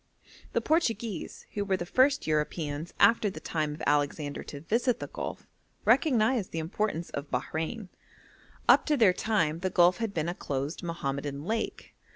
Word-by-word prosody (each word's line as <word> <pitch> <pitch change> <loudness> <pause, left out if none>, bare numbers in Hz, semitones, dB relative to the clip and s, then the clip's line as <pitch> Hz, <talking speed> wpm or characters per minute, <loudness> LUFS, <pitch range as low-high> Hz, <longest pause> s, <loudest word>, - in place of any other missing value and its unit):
The - - +2
Portuguese, 230 - -1
who 205 - -1
were 195 -2 0
the 175 - -4
first 275 +8 +3
Europeans 155 0 -1
after 230 -2 +5
the - - -8
time 155 -2 -2
of - - -9
Alexander 145 0 0
to 145 - -7
visit 235 - +1
the - - -4
Gulf, - - -6 0.4
recognised 240 - +3
the - - -5
importance 170 +1 -2
of 140 +1 -5
Bahrein. 160 - -3 0.8
Up - - +6
to 300 -2 +3
their 210 -7 +6
time 170 -7 0
the 185 +1 -1
Gulf 180 0 +4
had 225 -3 -2
been 165 -4 -2
a 175 - -1
closed 140 -1 -3
Mohammedan 140 -4 -3
lake. 220 +3 -3
175 Hz, 165 wpm, -29 LUFS, 150-220 Hz, 0.8 s, Up